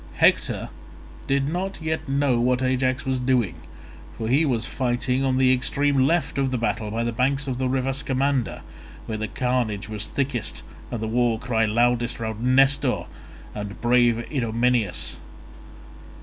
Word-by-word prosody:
Hector - - +2 0.6
did 135 0 +1
not 185 +5 -3
yet 160 -3 -3
know 135 -3 +2
what 125 +1 +1
Ajax 130 +1 0
was 130 -1 0
doing, 125 -6 +1 0.6
for 110 - -3
he 145 +6 +4
was 120 -6 0
fighting 125 +1 -1
on 130 -1 +1
the 130 0 +5
extreme 135 +1 +2
left 165 -3 0
of 135 -1 +1
the 130 - -1
battle 115 -2 -1
by 115 +2 -2
the 120 - -1
banks 135 +4 0
of 130 -2 -3
the 130 -1 0
river 135 0 0
Scamander, 135 -2 -1 0.4
where 110 -1 -4
the 110 - -2
carnage 120 -5 -1
was 105 0 -4
thickest 130 -4 -3 0.3
and 120 - -4
the 110 - -2
war 120 0 +1
cry 115 -1 0
loudest 120 +2 +1
round 110 -1 -4
Nestor 135 +1 +3 0.5
and 105 0 -6
brave 120 -1 +3
Idomeneus. 115 - 0
125 Hz, 155 wpm, -24 LUFS, 115-135 Hz, 0.6 s, the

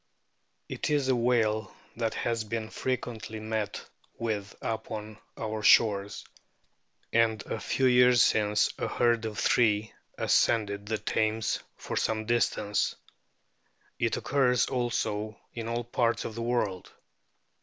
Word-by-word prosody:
It - - -3
is 145 -3 +1
a 130 - +4
whale 115 -4 +1 0.2
that 115 -1 -2
has 115 -1 -1
been 110 0 -4
fre - - -4
O - - +1
quently 110 -2 -7
met 110 -1 -3 0.3
with 105 -4 -3
upon 110 -1 -5 0.2
our 110 -1 -3
shores, 105 -2 +4 0.9
and 115 -1 +3
a - - -4
few 135 - 0
years 125 -1 +6
since 105 -1 +2
a - - -1
herd 120 -2 +1
of 110 -2 -5
three 110 -1 +2 0.2
ascended 100 -2 +1
the 110 0 0
Thames 110 +1 0 0.2
for - - -5
some 110 -1 0
distance. 105 -3 +1 1.0
It - - +1
occurs 125 -3 +2
also 110 -4 -2
in 115 -1 -5
all 120 +1 -2
parts 115 0 0
of 115 - -4
the 115 - -5
world. 115 -6 -1
110 Hz, 135 wpm, -29 LUFS, 105-120 Hz, 1.0 s, years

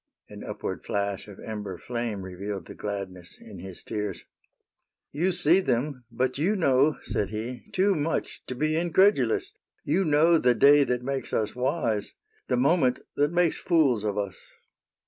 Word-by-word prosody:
"— - - -45
An - - -9
upward - - -5
flash 100 -1 -2
of 100 -2 -12
ember 105 -4 -5
flame 115 -2 -4
Revealed 95 0 -6
the - - -10
gladness 95 -4 -6
in - - -11
his 95 -2 -9
tears. 105 -4 -4 0.4
'' - - -59
You 185 +2 +3
see 170 0 +4
them, 130 -5 -1
but 130 +3 -1
you 190 +8 +2
know/* 145 -4 +3
said 100 - -2
he, 115 +4 -5
" - - -22
Too 195 +2 +3
much 160 -1 -2
to 130 - -4
be 155 +4 0
incredulous: 170 - +2 0.3
You 175 +7 +1
know 160 +1 +4
the 125 -3 +3
day 145 +5 +6
that 125 -1 -1
makes 135 +1 -3
us 105 0 0
wise. 125 -5 -1 0.3
The 125 - +1
moment 130 -1 +2
that 145 +1 +2
makes 175 -2 +2
fools 140 - +2
of 105 -1 -2
us. 100 -2 -3
125 Hz, 170 wpm, -27 LUFS, 105-155 Hz, 0.4 s, day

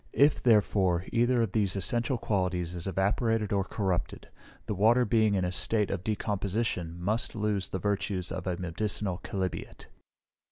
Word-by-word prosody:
If, 145 +2 +4
therefore, 95 -6 +3
either 120 +1 +3
of 110 - -2
these 100 -3 +1
essential 120 +6 0
qualities 90 -5 -1
is 85 +1 -5
evaporated 105 +3 0
or 100 -1 +2
corrupted, 95 -3 -3 0.4
the - - -2
water, 115 +5 +4
being 110 -1 +3
in 95 -2 +1
a 90 - -1
state 105 +2 0
of 95 -3 -3
decomposition, 100 -4 -2
must 110 +8 -1
lose 105 -3 -1
the - - -2
virtues 100 -2 -2
of 95 0 -4
a 90 -1 -1
medicinal 95 +1 -2
chalybeate. 95 -2 -4
100 Hz, 155 wpm, -29 LUFS, 90-110 Hz, 0.4 s, If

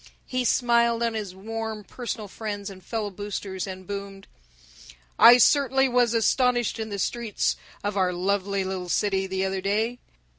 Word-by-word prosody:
He 255 0 -1
smiled 235 -1 +3
on 230 -1 0
his 205 -4 -5
warm 220 +1 -5
personal 225 0 -6
friends 205 -1 -5
and 185 -1 -13
fellow 215 -3 -3
boosters, 195 -1 -5
and 185 0 -8
boomed: 200 0 -7 0.9
"I 240 +1 +10
certainly 270 +1 +4
was 245 -2 +2
astonished 240 0 +2
in 220 0 -4
the 200 - -4
streets 230 +2 -1 0.3
of 205 0 -2
our 185 -2 +2
lovely 195 +2 -1
little 185 -1 -4
city, 195 0 +1
the 190 0 -1
other 190 0 -2
day. 220 +5 0
205 Hz, 155 wpm, -25 LUFS, 195-235 Hz, 0.9 s, I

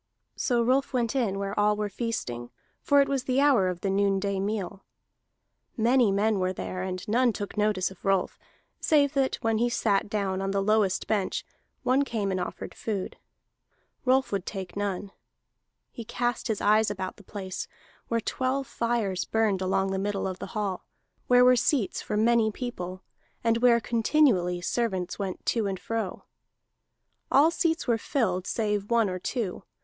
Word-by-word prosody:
So 240 -2 +1
Rolf 265 +4 +1
went 240 0 0
in 220 -7 0
where 200 0 -3
all 210 0 +3
were 210 0 -2
feasting, 185 - -4 0.3
for 285 -1 +4
it 275 - +2
was 275 -2 -1
the 260 +1 +1
hour 275 -10 +4
of 180 -1 -5
the 195 - -1
noonday 200 0 +1
meal. 195 -1 -3 0.9
Many 240 -1 +4
men 205 +1 +2
were 185 0 0
there, 185 0 -5
and 185 0 -4
none 240 +3 +3
took 205 -2 -6
notice 210 -3 +1
of 190 - -15
Rolf, 195 -2 0 0.4
save 285 -2 +3
that 270 -2 +1
when 225 -1 +1
he 240 +1 +2
sat 205 -4 +1
down 195 -2 -1
on 195 - -1
the 195 0 0
lowest 210 -2 +2
bench 205 -4 -1 0.4
one 260 +3 +3
came 215 -7 -2
and 185 - -1
offered 180 - -5
food. 200 -4 -4 0.9
Rolf 260 +1 +2
would 195 -2 -2
take 190 -3 -6
none. 200 -1 -3 0.8
He 235 - -7
cast 240 +2 -2
his 220 -3 -2
eyes 215 +1 +4
about 190 -2 -4
the 205 - -15
place, 190 -2 -6 0.4
where 230 - +1
twelve 260 +4 -1
fires 230 -6 -1
burned 215 -4 +1
along 190 +1 +1
the 190 - -1
middle 200 0 -1
of 185 -1 -5
the - - -5
hall, 195 -3 -2 0.4
where 250 0 +6
were 250 0 +7
seats 245 -3 +1
for 210 - -3
many 225 0 +4
people, 185 -6 -6 0.4
and 230 0 +2
where 235 -1 +5
continually 225 -7 +2
servants 190 -3 -2
went 195 -2 -4
to 225 -4 +1
and 190 -2 -3
fro. 220 0 -3 1.1
All 300 +4 +5
seats 330 -1 0
were 235 -2 +1
filled 190 -8 -1
save 210 -3 -1
one 230 -2 +3
or 185 -1 -3
two. 215 -1 -3
210 Hz, 170 wpm, -27 LUFS, 195-240 Hz, 1.1 s, were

